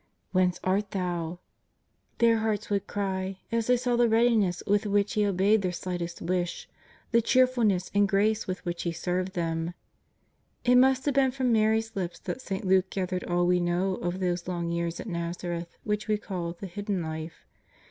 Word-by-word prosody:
" - - -46
Whence 185 -1 +2
art 195 +2 +1
Thou 175 -3 -2 0.4
?" - - -45
their 230 -1 +4
hearts 220 -2 -1
would 200 -1 0
cry, 190 -1 -2
as 230 -1 0
they 250 0 +4
sa'T 245 -1 0
the 240 -1 +5
read 230 +2 +4
iness 195 -6 +1
with 205 +1 +2
which 205 0 +1
He 210 - +2
obeyed 200 +3 +3
their 185 -2 -1
slightest 175 -1 -4
wish, 175 0 -2 0.4
the 230 0 +5
cheerfulness 235 -7 +2
and 205 0 +3
grace 215 +2 +2
with 185 +1 -4
which 175 0 -3
He 170 - -2
served 180 +2 -2
them. 165 0 -2 0.9
It 250 0 +6
must 265 0 +4
have 290 - +2
been 270 0 +4
from 255 -2 0
Mary's 220 0 +2
lips 175 -3 -3
that 260 - -4
St. 195 -3 -4
Luke 185 0 +3
gathered 185 -1 -2
all 175 0 +1
we 180 0 +3
know 175 +2 +1
of 175 +1 -3
those 175 -2 -1
long 170 -2 -2
years 170 0 -2
at - - -6
Nazareth 170 -2 -4
which 210 +1 -2
we 215 -1 +2
call 180 -5 -4
the 180 - -9
Hidden 200 -1 -3
Life. 160 0 -6
190 Hz, 190 wpm, -28 LUFS, 175-220 Hz, 0.9 s, It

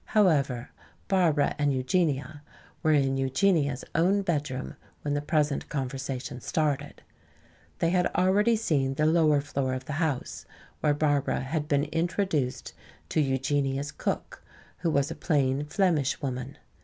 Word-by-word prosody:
However, 140 - +2 0.4
Barbara 170 -7 +2
and 145 -1 +2
Eugenia 140 +1 0 0.4
were 155 - +3
in 135 -2 +2
Eugenia's 140 0 +1
own 190 +5 +3
bedroom 145 -7 -2 0.3
when 145 - -1
the 145 - 0
present 150 -1 0
conversation 135 -1 -4
started. 150 -1 -2 0.7
They 165 - +1
had 180 -1 +3
already 205 +5 +3
seen 140 -11 0
the 150 - +1
lower 155 -2 +4
floor 140 -2 -2
of 130 0 -6
the 150 - -4
house, 150 -6 -2 0.3
where 150 -1 +2
Barbara 145 -3 +1
had 150 +3 -2
been 145 -1 +2
introduced 165 -3 -1 0.4
to 155 - +2
Eugenia's 135 +1 0
cook, - - -4 0.4
who 170 - 0
was 140 -2 +1
a - - -4
plain 140 -3 +1
Flemish 155 -4 +1
woman. 130 0 -4
145 Hz, 135 wpm, -27 LUFS, 135-160 Hz, 0.7 s, lower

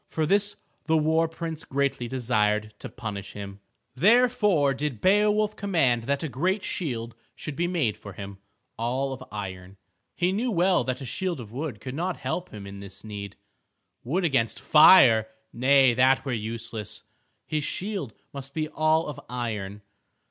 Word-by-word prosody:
For 160 - -1
this 205 +4 +2 0.3
the 160 0 +4
war 160 +1 +2
prince 165 -1 -6
greatly 135 -3 -1
desired 110 -4 0
to - - -7
punish 105 -4 -6
him. 100 -1 -8 0.3
Therefore 210 - +4
did 140 -4 -3
Beowulf 210 - +3
command 135 - +1
that 140 +4 -1
a - - -1
great 185 +9 -1
shield 120 -9 -3 0.2
should 150 - -6
be 175 +4 0
made 155 - 0
for 105 -2 -10
him, 100 0 -8 0.4
all 130 +4 -1
of 130 - -8
iron. 95 -2 -7 0.4
He 180 +1 +1
knew 225 +6 0
well 185 -3 +3
that 130 +1 -3
a - - -5
shield 175 +5 -3
of 110 -4 -9
wood 130 -3 -5
could 130 +3 -6
not 175 +4 -2
help 160 +7 -3
him 105 -2 -9
in 100 0 -9
this 100 0 -9
need. 100 -2 -7 0.7
Wood 170 +10 -1
against 125 -8 +1
fire! 130 - +7 0.3
Nay, 130 +1 +5
that 130 +3 +3
were 135 - -1
useless. 115 -1 -5 0.4
His 155 -1 -2
shield 190 - -4 0.2
must 140 0 -8
be 155 -1 -1
all 155 +1 +2
of 150 - -6
iron. 105 -5 -4
135 Hz, 160 wpm, -26 LUFS, 110-165 Hz, 0.7 s, fire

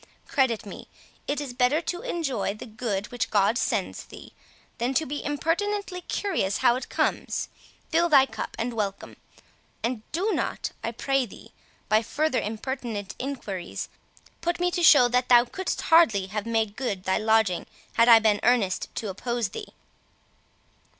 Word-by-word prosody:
Credit 260 -7 +1
me, 200 - -9 0.4
it 285 - -1
is 280 -4 -5
better 250 +4 +2
to 350 +2 -4
enjoy 275 - -2
the 215 - -9
good 215 -3 -3
which 245 - -2
God 205 +2 +3
sends - - -1
thee, - - -13 0.5
than 245 +3 -1
to 315 - +2
be 290 +1 -4
impertinently 360 +6 -1
curious 330 - -1
how 240 - +6
it 255 - -5
comes. - - -1 0.4
Fill 340 +1 +3
thy 275 -4 +7
cup, - - -6
and 235 +1 -2
welcome; 200 -3 -4 0.7
and 235 -1 -1
do 380 +8 0
not, - - -2
I 230 - -1
pray 270 +2 0
thee, - - -14 0.4
by 215 +1 +4
further 295 +4 0
impertinent 220 -2 -4
enquiries, 215 -10 -5 0.5
put 345 +1 -1
me 355 0 +1
to 355 - -1
show 290 -7 +8
that 250 +1 +1
thou 240 -1 +7
couldst 375 +9 -3
hardly 305 - +5
have 210 +3 -4
made 220 -2 0
good 210 -8 -3
thy 190 +2 +1
lodging 220 -4 +2 0.3
had 230 +1 +4
I 230 - +10
been 215 -2 +3
earnest 225 -6 +2
to 215 - -3
oppose 235 +2 -2
thee." - - -7
245 Hz, 160 wpm, -26 LUFS, 215-295 Hz, 0.7 s, I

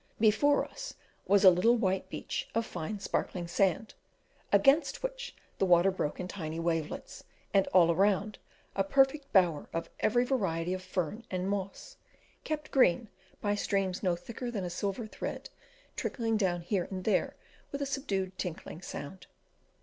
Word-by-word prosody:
Before 225 +7 +4
us - - -8 0.3
was 200 0 +4
a 190 - +10
little 190 +7 +4
white 190 -3 0
beach - - -4
of 230 0 +1
fine 185 +2 -5
sparkling 180 -2 -2
sand, 195 +4 +1 0.6
against 275 - +4
which - - -4 0.2
the - - +3
water 180 +2 +5
broke 150 -5 -3
in 180 - -3
tiny 165 -4 -5
wavelets, 165 - -3 0.3
and 195 -1 +4
all 170 -2 +5
around 200 +3 +1 0.4
a 195 - +2
perfect 270 +6 +2
bower 175 -7 +3
of 165 - -4
every 245 +3 +3
variety 185 -9 0
of 185 - -4
fern 185 +3 -3
and 185 0 -2
moss, 200 - -4 0.5
kept 305 0 -4
green 230 -4 +3 0.3
by 205 -1 +1
streams 195 -2 -1
no 180 -3 +2
thicker 235 +7 -6
than 210 -5 -3
a 175 - -4
silver 200 +5 -2
thread 215 - -6 0.4
trickling 225 -3 -1
down 185 -5 +1
here 180 +1 -1
and 185 -1 -5
there 215 - +1 0.4
with 280 - -3
a 280 - -1
subdued 195 -10 -2
tinkling 170 -1 -5
sound. 185 +1 -8
195 Hz, 155 wpm, -31 LUFS, 180-230 Hz, 0.6 s, a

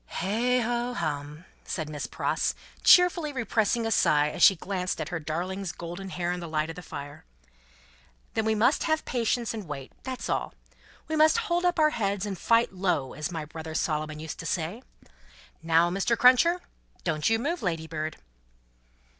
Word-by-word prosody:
"Heigh 235 +7 0
ho 240 +1 -1
hum!" 150 +1 -4 0.2
said 160 -4 -4
Miss 150 -1 -5
Pross, - - -1 0.3
cheerfully 350 -4 +6
repressing 230 -2 0
a 225 - -1
sigh 150 -7 +3
as - - -6
she 195 - +8
glanced 185 +1 -3
at - - -3
her 175 -2 -3
darling's 175 +5 -3
golden 175 +3 -7
hair 175 -1 -2
in 180 - -3
the 170 -2 -7
light 155 0 -1
of - - -10
the 180 - -8
fire, 145 -4 -8 1.1
"then 220 - 0
we 220 0 +1
must 235 +7 +3
have 315 -1 0
patience 235 -1 0
and 215 -5 -6
wait: 135 -3 -7
that's 260 -1 -5
all. - - -2 0.5
We 315 - -2
must 310 +3 +5
hold 355 -6 0
up 355 - +2
our 305 -1 +4
heads 200 -5 -1
and 200 -2 -3
fight 230 +3 +2
low, 180 -8 -1
as 150 - -4
my 165 -3 -4
brother 160 +1 -8
Solomon 155 -1 -1
used 160 -1 -7
to 165 - -5
say. 175 +8 -2 0.8
Now, 165 +1 +3
Mr. 195 +5 +1
Cruncher! 335 +8 +5 0.4
Don't 155 -1 0
you 225 - +3
move, 315 +10 -2
Ladybird!" 160 -4 -3
190 Hz, 175 wpm, -27 LUFS, 160-240 Hz, 1.1 s, she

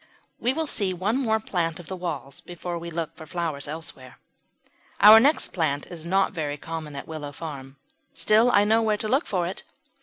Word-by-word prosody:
We 245 - +1
will 320 +4 -1
see 200 -10 -1
one 195 +6 0
more 220 -5 +1
plant 170 -6 -2
of 175 - -10
the 190 - -5
walls 155 -7 -5
before 175 0 -6
we 170 +1 -7
look 165 -1 -4
for 160 - -11
flowers 160 -5 -3
elsewhere. 145 -4 -6 0.8
Our 215 +3 +10
next 285 +6 +3
plant 150 -5 -1
is 165 -3 -7
not 190 +2 +2
very 150 -4 -3
common 155 -1 -6
at 140 - -7
Willow 155 -3 -6
Farm; 140 -4 -8 0.4
still 215 +8 +4
I 205 -4 +5
know 220 +2 +3
where 215 -2 +1
to 215 - -3
look 265 +7 +1
for 180 -3 0
it. 180 - -5
175 Hz, 200 wpm, -25 LUFS, 155-210 Hz, 0.8 s, Our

